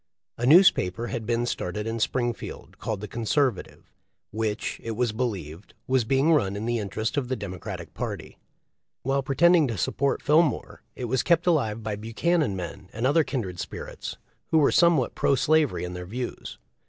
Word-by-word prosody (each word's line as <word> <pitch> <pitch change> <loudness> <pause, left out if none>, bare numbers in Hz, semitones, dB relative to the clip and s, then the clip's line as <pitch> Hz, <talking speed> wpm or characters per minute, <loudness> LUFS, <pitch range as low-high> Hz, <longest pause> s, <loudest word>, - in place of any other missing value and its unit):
A 120 - 0
newspaper 120 - +5
had 115 -4 -4
been 120 0 +1
started 105 -2 -3
in 115 +1 -3
Springfield 120 +1 -3
called 110 -3 -3
the 105 - -5
Conservative, 120 0 -1 0.4
which, 110 0 -2
it 115 - -3
was 120 0 0
believed, 100 -8 -4
was 130 -3 +2
being 135 +7 +3
run 100 -10 +2
in 105 +2 -4
the 120 0 0
interest 110 +5 -3
of 135 -3 0
the 130 - -1
Democratic 95 -5 -7
party. - - -6 0.6
While 135 +2 +1
pretending 160 +4 +4
to 115 -4 -3
support 140 +10 0
Fillmore 150 -3 +2
it 125 - -4
was 125 +1 +1
kept 170 0 +2
alive 115 -11 +1
by 105 -1 -3
Buchanan 115 - 0
men 90 +1 -7
and 115 +3 -3
other 150 +4 +4
kindred 100 -12 -4
spirits, - - -6 0.3
who 160 - +2
were 145 -3 +4
somewhat 170 -7 +4
pro 140 - +2
slavery 155 -2 +2
in 90 0 -4
their 90 0 -7
views. 120 +5 -5
120 Hz, 170 wpm, -26 LUFS, 105-140 Hz, 0.6 s, newspaper